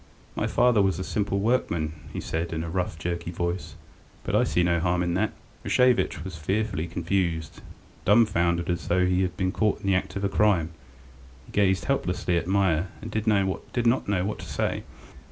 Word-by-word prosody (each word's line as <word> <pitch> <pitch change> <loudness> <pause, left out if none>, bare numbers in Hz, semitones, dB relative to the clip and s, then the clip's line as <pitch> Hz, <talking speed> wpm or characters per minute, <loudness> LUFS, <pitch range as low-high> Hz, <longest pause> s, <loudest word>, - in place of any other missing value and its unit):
"My - - 0
father 120 -3 +4
was 95 -1 +2
a 95 - -3
simple 100 0 -1
workman," 85 -8 0 0.2
he - - -4
said, 80 +1 -3
in 80 0 -2
a 85 - -5
rough, 90 -3 -2
jerky 85 +1 -3
voice, 85 +1 -3 0.5
"but - - -4
I - - +5
see 90 - +1
no 85 -1 +2
harm 90 +1 +1
in 85 -1 -1
that." 105 +4 +1 0.3
Rashevitch 125 -10 +2
was 95 -1 -6
fearfully 95 +1 -1
confused. 85 -2 -2 0.4
Dumbfoundered, 90 -6 +3
as 85 - -3
though 90 +1 +3
he 90 0 +2
had 90 -1 -2
been 95 -1 0
caught 105 0 0
in - - -9
the 100 - +3
act 95 - -1
of 100 - -3
a - - +3
crime, 95 -5 +2 0.7
he - - -15
gazed 95 -2 +2
helplessly 90 -9 0
at 85 0 -1
Meier, 95 -3 +2
and 110 +2 -8
did 110 +1 -2
not 110 +4 +1
know 95 -3 +1
what 105 - -3
to - - -7
say. - - -1
95 Hz, 190 wpm, -26 LUFS, 85-100 Hz, 0.7 s, I